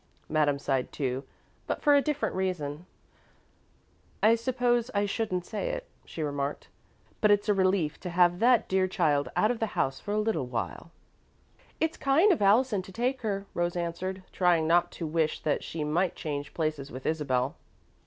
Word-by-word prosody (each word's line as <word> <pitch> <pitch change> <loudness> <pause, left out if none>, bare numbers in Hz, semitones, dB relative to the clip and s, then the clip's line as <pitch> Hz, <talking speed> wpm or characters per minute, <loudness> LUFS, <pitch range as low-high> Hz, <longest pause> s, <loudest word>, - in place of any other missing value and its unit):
Madame 150 -2 +2
sighed 135 -2 -1
too, 130 -2 -2 0.4
but - - -3
for 295 - +6
a 285 - +6
different 300 0 -1
reason. 180 -4 -3 1.4
"I 220 +2 +7
suppose 240 0 +1
I 200 0 +2
shouldn't 195 -4 -2
say 220 - -3
it," - - -4 0.2
she 160 - -5
remarked, 145 -1 -3 0.5
"but 210 - +4
it's 205 0 +3
a 210 - +4
relief 185 -5 +1
to 180 - -5
have 175 0 +3
that 240 -1 +4
dear 190 0 +2
child 155 -7 +1
out 215 - +3
of 240 - -3
the 225 - 0
house 135 0 0
for 205 - -6
a - - +1
little 210 - 0
while." 125 +6 -4 0.9
"It's 320 0 0
kind 315 +10 +4
of 335 - +1
Allison 210 +1 +4
to 190 - -12
take 250 +6 -1
her," 200 -3 -2
Rose 175 0 -1
answered, 180 +2 -3
trying 175 -3 +3
not 175 +2 +3
to 170 - -5
wish 155 0 -1
that 150 - 0
she 160 -2 -4
might 165 +5 0
change 145 -2 -5
places 155 -4 -2
with 130 +1 -8
Isabel. 140 -4 0
180 Hz, 175 wpm, -28 LUFS, 150-220 Hz, 1.4 s, I